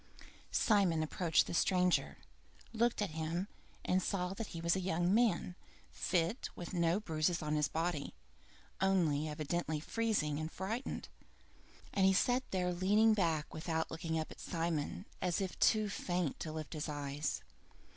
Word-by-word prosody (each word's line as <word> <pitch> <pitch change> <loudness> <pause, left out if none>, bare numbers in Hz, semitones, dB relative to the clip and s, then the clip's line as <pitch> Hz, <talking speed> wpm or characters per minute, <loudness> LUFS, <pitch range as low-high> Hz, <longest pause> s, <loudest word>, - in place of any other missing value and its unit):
II - - -15 0.2
Simon 190 -7 +3
approached 165 +1 +2
the - - -5
stranger, 180 0 +2 0.6
looked 230 -1 +2
at 195 - -3
him, 160 +4 -2 0.4
and 185 +1 +2
saw 180 -1 -1
that 220 +1 -5
he 165 - -7
was 170 +2 +2
a - - 0
young 175 0 +1
man, 215 -6 +2 0.4
fit, 180 +6 0
with 175 - -7
no 170 +1 +2
bruises 165 -3 0
on 150 0 -1
his 150 -1 +2
body, 160 - -2 0.7
only 165 -6 +2
evidently 155 +1 -2
freezing 170 -6 0
and 155 +1 -4
frightened, 220 +8 -4 0.9
and 195 - +2
he 190 - +5
sat 245 +6 +3
there 180 -1 0
leaning 205 +5 +4
back 165 -7 0
without 160 0 -2
looking 160 0 -2
up 155 - -3
at - - -11
Simon, 165 +1 -2 0.2
as 180 -2 +1
if 190 -2 -3
too 215 -1 +4
faint 180 -5 -2
to 155 - -4
lift 155 0 -5
his 155 0 -3
eyes. 145 0 -3
175 Hz, 155 wpm, -35 LUFS, 160-190 Hz, 0.9 s, he